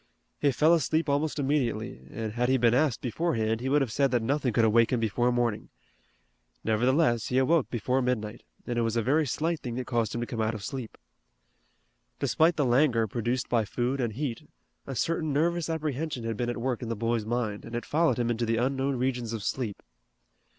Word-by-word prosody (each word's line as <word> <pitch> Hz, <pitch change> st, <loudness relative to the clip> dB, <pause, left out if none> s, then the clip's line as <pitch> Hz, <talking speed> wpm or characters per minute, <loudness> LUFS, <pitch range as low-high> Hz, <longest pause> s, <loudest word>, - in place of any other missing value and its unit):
He 145 Hz, -, +3 dB
fell 155 Hz, +6 st, +4 dB
asleep 160 Hz, 0 st, +1 dB
almost 145 Hz, +2 st, 0 dB
immediately 120 Hz, -, -1 dB
and 110 Hz, +3 st, -5 dB
had 125 Hz, +2 st, 0 dB
he 130 Hz, -, +4 dB
been 120 Hz, -1 st, +3 dB
asked 135 Hz, -2 st, +2 dB
beforehand 115 Hz, -5 st, -1 dB
he 130 Hz, -, -2 dB
would 145 Hz, +1 st, +3 dB
have 125 Hz, -, -4 dB
said 140 Hz, +4 st, +2 dB
that 120 Hz, -2 st, +1 dB
nothing 135 Hz, +1 st, 0 dB
could 115 Hz, +1 st, +3 dB
awake 115 Hz, +1 st, +4 dB
him 125 Hz, -, +1 dB
before 115 Hz, +3 st, +1 dB
morning. 120 Hz, -3 st, -1 dB, 0.9 s
Nevertheless 120 Hz, +2 st, +2 dB
he 125 Hz, -, 0 dB
awoke 140 Hz, +3 st, +3 dB
before 125 Hz, +3 st, 0 dB
midnight, 115 Hz, -4 st, -2 dB, 0.2 s
and 120 Hz, -1 st, -1 dB
it -, -, +2 dB
was 115 Hz, 0 st, 0 dB
a 115 Hz, -, +1 dB
very 150 Hz, +5 st, +2 dB
slight 160 Hz, +5 st, -1 dB
thing 120 Hz, -2 st, -5 dB
that 125 Hz, 0 st, -3 dB
caused 115 Hz, -3 st, -1 dB
him 120 Hz, -, -2 dB
to -, -, -1 dB
come 115 Hz, -1 st, -4 dB
out 110 Hz, 0 st, 0 dB
of 105 Hz, -, -7 dB
sleep. 130 Hz, -1 st, -6 dB, 1.2 s
Despite 165 Hz, +2 st, +2 dB
the 145 Hz, -, +1 dB
languor 120 Hz, -2 st, +3 dB
produced 120 Hz, +3 st, -2 dB
by 115 Hz, -2 st, +2 dB
food 125 Hz, +6 st, -1 dB
and 115 Hz, -3 st, -1 dB
heat 130 Hz, -1 st, -4 dB, 0.4 s
a 135 Hz, -, -4 dB
certain 160 Hz, +2 st, 0 dB
nervous 170 Hz, +3 st, +1 dB
apprehension 155 Hz, -4 st, -2 dB
had 115 Hz, 0 st, -2 dB
been 120 Hz, +2 st, -2 dB
at 120 Hz, -, -3 dB
work 125 Hz, 0 st, -2 dB
in 120 Hz, -, -5 dB
the 115 Hz, -, -1 dB
boy's 115 Hz, 0 st, -1 dB
mind, 110 Hz, -3 st, -2 dB
and 115 Hz, -, -7 dB
it 120 Hz, -, -3 dB
followed 165 Hz, 0 st, +2 dB
him 120 Hz, -1 st, 0 dB
into 120 Hz, 0 st, -1 dB
the 115 Hz, 0 st, +1 dB
unknown 135 Hz, +3 st, 0 dB
regions 125 Hz, -2 st, -1 dB
of 110 Hz, -3 st, -4 dB
sleep. 115 Hz, -5 st, -3 dB
125 Hz, 210 wpm, -28 LUFS, 115-140 Hz, 1.2 s, fell